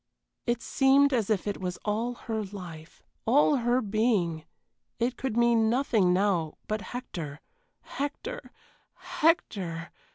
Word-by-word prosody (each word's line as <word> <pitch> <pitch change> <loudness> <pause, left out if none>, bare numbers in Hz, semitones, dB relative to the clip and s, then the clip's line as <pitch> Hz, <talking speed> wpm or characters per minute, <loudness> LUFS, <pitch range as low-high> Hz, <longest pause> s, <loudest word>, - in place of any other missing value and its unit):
It 240 0 0
seemed 275 +1 +4
as 225 -5 +1
if 210 -4 +1
it 205 -2 -3
was 180 -1 -3
all 225 +4 -1
her 220 -2 -3
life, 175 -5 -10 0.2
all 285 +4 +5
her 240 +1 +2
being 200 -7 +1 0.5
it 240 +2 0
could 260 -4 -3
mean 235 -2 +4
nothing 230 -7 +2
now 180 -4 +1
but 215 0 -1
Hector 170 - -6 0.4
Hector 290 - -5 0.5
Hector! 185 - 0
220 Hz, 125 wpm, -28 LUFS, 185-245 Hz, 0.5 s, all